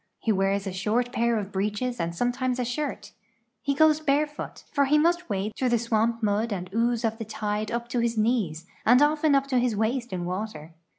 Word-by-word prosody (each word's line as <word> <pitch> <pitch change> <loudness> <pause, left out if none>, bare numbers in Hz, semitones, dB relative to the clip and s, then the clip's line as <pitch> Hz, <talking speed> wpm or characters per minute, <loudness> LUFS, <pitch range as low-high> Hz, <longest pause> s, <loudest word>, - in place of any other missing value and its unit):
He 225 - 0
wears 195 0 +1
a 190 - -4
short 225 +6 0
pair 235 -1 +1
of 205 -1 -4
breeches 210 +6 -2
and 170 0 -2
sometimes 245 +4 0
a 250 - -1
shirt. 280 +4 -4 0.5
He 280 - 0
goes 315 0 +5
bare 300 -1 +2
foot, 295 0 -9
for 285 -1 +3
he 295 +3 +4
must 345 +3 +2
wade 200 +2 -2
through 255 - 0
the 240 - +3
swamp 230 0 0
mud 215 +2 +1
and 185 -2 -4
ooze 235 +1 +1
of 225 0 -1
the - - -3
tide 210 0 -3
U}) 235 - 0
to 245 0 -1
his 235 -1 0
knees, 215 -8 0 0.2
and 245 +3 +6
often 295 0 +3
up 275 0 +3
to 260 -2 +1
his 240 -3 +1
waist 235 +4 -1
in 180 -2 -3
water. 180 -4 -5
235 Hz, 220 wpm, -26 LUFS, 210-255 Hz, 0.5 s, and